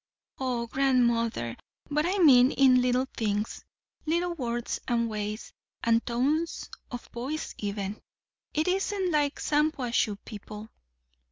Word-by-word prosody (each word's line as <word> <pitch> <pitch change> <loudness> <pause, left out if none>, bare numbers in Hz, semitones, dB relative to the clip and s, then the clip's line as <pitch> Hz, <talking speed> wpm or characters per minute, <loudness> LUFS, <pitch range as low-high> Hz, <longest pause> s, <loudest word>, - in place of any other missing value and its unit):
"O 250 -3 -1
grandmother, 235 - +1 0.4
but 300 +3 +2
I 385 +3 0
mean 260 -8 +7
in 255 -2 +5
little 250 +1 +2
things; 210 -1 -2 0.4
little 345 +2 +1
words 240 -6 -3
and 235 -2 +1
ways, 210 0 -4 0.3
and 230 -1 +3
tones 285 +8 -1 0.2
of 245 -1 -6
voice 270 +6 -4
even. 200 0 -3 0.5
It 310 +2 0
isn't 385 0 0
like 295 -2 +1
Shampuashuh 270 -8 +1
people." 210 0 -9
250 Hz, 115 wpm, -28 LUFS, 230-300 Hz, 0.5 s, mean